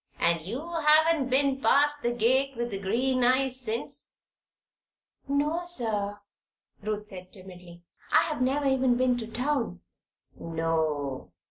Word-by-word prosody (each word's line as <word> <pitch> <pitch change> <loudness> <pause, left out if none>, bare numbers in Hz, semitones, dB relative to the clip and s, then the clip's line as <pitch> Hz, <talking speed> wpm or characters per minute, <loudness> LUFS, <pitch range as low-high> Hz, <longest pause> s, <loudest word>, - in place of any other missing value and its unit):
"And 170 -1 +2
you 240 - -6 0.2
haven't 305 -2 +4
been 270 +1 +2
past 290 +1 +3
the 240 - 0
gate 255 +3 +1
with 240 0 -2
the 195 - -4
green 250 +6 0
eyes 260 +1 +2
since?" 230 -1 -3 1.1
"No, 290 +4 +1
sir," 215 -11 -1 0.6
Ruth 210 0 -3
said, 185 -3 -8
timidly. 180 -3 -10 0.3
"I - - +5
have 305 -5 -3
never 275 +3 +1
even 260 -2 +2
been 255 0 +2
to 225 - -5
town." 245 - -2 0.5
"No. 155 - -2
245 Hz, 130 wpm, -27 LUFS, 190-270 Hz, 1.1 s, I